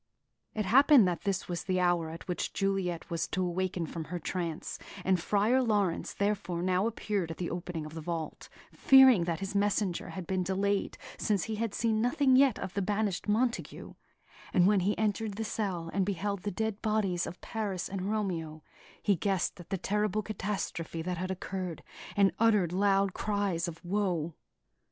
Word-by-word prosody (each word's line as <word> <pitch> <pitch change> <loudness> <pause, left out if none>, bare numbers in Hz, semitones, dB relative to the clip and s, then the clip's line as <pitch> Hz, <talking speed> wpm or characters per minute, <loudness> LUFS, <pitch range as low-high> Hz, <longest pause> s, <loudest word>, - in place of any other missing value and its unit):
It 215 -2 -1
happened 270 0 +7
that 175 +1 -3
this 195 -2 -1
was 175 -1 -4
the 185 -1 +1
hour 175 -2 +2
at 165 +3 -9
which 180 - -2
Juliet 190 -4 -1
was 165 -1 -1
to 185 0 -1
awaken 180 -1 -1
from 160 0 -6
her 180 - -4
trance; 170 -1 -4 0.3
and 185 -1 +3
Friar 210 +8 +2
Laurence 205 -7 0
therefore 195 -4 -1
now 185 +3 +2
appeared 205 -6 -2
at 165 - -6
the 175 - -3
opening 175 -2 -4
of 155 - -9
the 160 - -6
vault, 165 -1 -5 0.2
fearing 265 -9 +7
that 170 +1 -2
his 195 +1 -4
messenger 200 -2 0
had 185 -2 -6
been 185 +1 -1
delayed, 195 +2 0 0.2
since 205 -4 +1
he 220 -1 -3
had 225 -2 -2
seen 220 -2 +1
nothing 260 +2 +3
yet 265 -3 +5
of 190 - -5
the 200 - -1
banished 205 -1 -1
Montague; 235 +3 -1 0.6
and 180 - +4
when 205 0 +4
he 195 +3 0
entered 215 -1 -1
the 225 - -3
cell 190 -6 -3
and 195 - +2
beheld 200 +1 -2
the 205 - -2
dead 220 +1 -2
bodies 210 -5 0
of 180 - -8
Paris 205 -5 -3
and 195 0 -3
Romeo, 170 -8 -2 0.4
he 205 - +3
guessed 190 0 -1
at 175 - -11
the 195 - -1
terrible 210 +2 0
catastrophe 190 -6 -3
that 180 0 -3
had 185 +1 -3
occurred, 185 -2 -4 0.3
and 195 -2 +5
uttered 210 -7 +3
loud 195 0 +2
cries 200 -5 -1
of 165 0 -8
woe. 175 -4 0
195 Hz, 180 wpm, -30 LUFS, 175-210 Hz, 0.6 s, happened